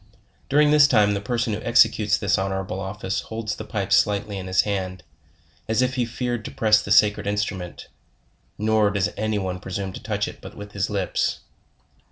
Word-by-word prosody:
During 150 +2 +4
this 150 -1 +7
time 105 -6 +3
the 100 - -2
person 115 +1 -1
who 105 - -4
executes 110 -3 +3
this 100 -1 +1
honorable 95 0 -3
office 95 0 -3
holds 110 -1 -5
the - - -7
pipe 100 -2 -2
slightly 100 0 +1
in 95 - -7
his 95 0 +3
hand, 95 -3 -3 0.6
as 110 +3 +2
if 130 0 0
he 125 -2 0
feared 120 0 -3
to - - -4
press 110 -1 +3
the 100 - -6
sacred 105 0 +4
instrument; 100 -3 -3 0.7
nor 110 0 +2
does 100 0 0
any 110 -1 -1
one 95 -2 -3
presume 95 0 -5
to - - -8
touch 105 -2 -2
it - - -10
but - - -11
with 105 0 -9
his 100 -2 -2
lips. 100 -3 -1
105 Hz, 190 wpm, -23 LUFS, 95-110 Hz, 0.7 s, this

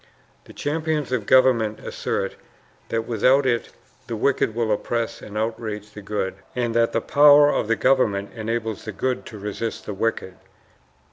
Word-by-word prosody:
The - - -14
champions 155 -2 -2
of 120 -5 -1
government 120 -5 +4
assert - - -3 0.5
that 115 0 -1
without 130 +5 +3
it 120 -2 0 0.4
the 115 - -3
wicked 110 -1 +1
will 115 -2 0
oppress 115 +2 -2
and 105 0 -8
outrage 110 -1 -3
the 105 - -10
good, 100 -1 -2 0.2
and 120 -2 -1
that 115 0 +2
the 115 - 0
power 145 +2 +6
of - - -1
the 115 - +2
government 110 -8 +1
enables 115 -1 -3
the 110 - -5
good 130 +5 -2
to 110 - -9
resist 105 +3 -5
the 105 - -4
wicked." 100 -2 -2
115 Hz, 160 wpm, -23 LUFS, 105-130 Hz, 0.5 s, power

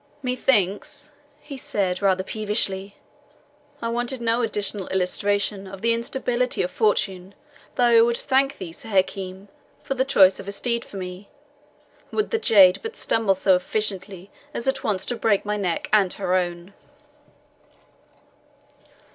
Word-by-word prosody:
"Methinks," 255 +3 0 0.3
he 285 -2 -9
said, 190 -7 -1
rather 190 -2 +2
peevishly, 200 -2 -2 0.9
"I 230 - -1
wanted 240 +2 -2
no 235 +1 +1
additional 205 -3 -1
illustration 195 +2 -1
of 190 +1 -10
the 230 0 +3
instability 245 0 -1
of 180 - -3
fortune 195 -3 0 0.4
though 250 - +1
I 235 -1 +6
would 235 0 +2
thank 270 0 +1
thee, 180 -3 -7
Sir 225 - -9
Hakim, 190 0 -1 0.4
for 275 - -2
the 260 -1 +1
choice 195 -8 +5
of 195 - -9
a - - -3
steed 235 +3 -1
for 200 - -10
me, 185 +1 -7 0.8
would 425 - -1
the 455 - +1
jade 195 - +6
but 450 +1 -6
stumble 215 -4 +1
so 190 0 +3
effectually 190 0 -3 0.2
as 235 - -3
at 265 0 0
once 195 -3 -1
to 245 - -2
break 215 -3 +1
my 210 0 -1
neck 185 -5 -2
and 200 -4 +4
her 185 -2 -2
own." 175 +1 -2
205 Hz, 145 wpm, -23 LUFS, 190-235 Hz, 0.9 s, I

